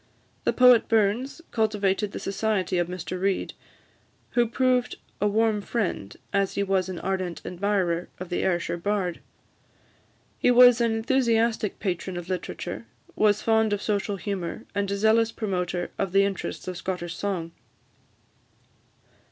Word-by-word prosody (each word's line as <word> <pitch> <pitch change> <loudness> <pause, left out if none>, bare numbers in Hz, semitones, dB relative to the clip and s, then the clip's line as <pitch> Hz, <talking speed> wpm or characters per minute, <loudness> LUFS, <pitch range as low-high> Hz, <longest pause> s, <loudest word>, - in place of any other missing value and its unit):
The - - +4
poet 250 -2 +6
Burns 225 +8 +1
cultivated 210 -2 0
the - - -6
society 195 -3 -1
of 175 - +1
Mr 180 0 -5
Reid, 195 0 0 0.8
who 240 -1 +3
proved 250 +1 +1 0.3
a 210 - +3
warm 215 0 +2
friend, 200 - -3 0.2
as 195 -1 +1
he 200 - +1
was 190 -1 0
an 185 - -5
ardent 185 -3 -3
admirer, 180 -2 0
of 185 -1 -6
the 175 - -1
Ayrshire 175 -2 0
bard. 185 -2 -1 1.2
He - - +3
was 245 -1 +7
an 230 -1 +2
enthusiastic 225 -2 +1
patron 185 -1 -3
of 175 +1 -7
literature, 185 -1 -5 0.3
was 210 0 +3
fond 220 -1 +3
of 205 - -1
social 205 -1 -1
humour, 195 -3 -4
and 200 -1 -1
a 200 - -1
zealous 220 +2 +3
promoter 180 -5 -2
of 195 -2 -1
the 195 0 +5
interests 195 -2 -4
of 185 -1 -4
Scottish 175 -2 -4
song. 180 -5 -3
200 Hz, 145 wpm, -26 LUFS, 185-220 Hz, 1.2 s, was